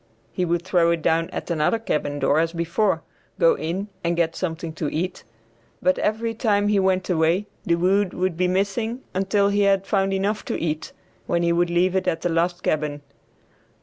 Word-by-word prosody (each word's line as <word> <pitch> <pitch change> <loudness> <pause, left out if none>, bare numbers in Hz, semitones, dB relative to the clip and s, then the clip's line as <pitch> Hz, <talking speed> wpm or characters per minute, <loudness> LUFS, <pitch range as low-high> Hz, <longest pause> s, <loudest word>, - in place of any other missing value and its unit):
He 180 - -1
would 170 0 0
throw 175 -2 +3
it 170 -2 0
down 165 +1 +2
at - - -5
another 155 +6 +2
cabin 150 -9 -2
door 145 +1 +2
as 165 +1 0
before, 170 +5 0 0.3
go - - +5
in 185 +5 -3 0.2
and 170 0 +1
get 165 -1 0
something 165 -2 -4
to 155 -2 -3
eat; 180 +4 -3 0.6
but 185 - +2
every 225 +2 0
time 215 -3 +1
when 205 - +1
he 205 - +3
went 190 -1 +1
away 170 +3 +2 0.2
the 170 - +4
wood 190 +2 +2
would 185 -1 0
be 180 +2 +1
missing 200 +6 -1
until 195 +2 +2
he 205 0 +1
had 195 -1 +3
found 195 -2 +1
enough 200 +2 -1
to - - -2
eat, 155 -1 -3 0.4
when 170 - +1
he 170 0 +2
would 175 0 +2
leave 180 +2 +2
it 185 -1 0
at 165 -3 0
the 175 - 0
last 175 +2 0
cabin. 150 -2 -1
180 Hz, 200 wpm, -23 LUFS, 165-195 Hz, 0.6 s, go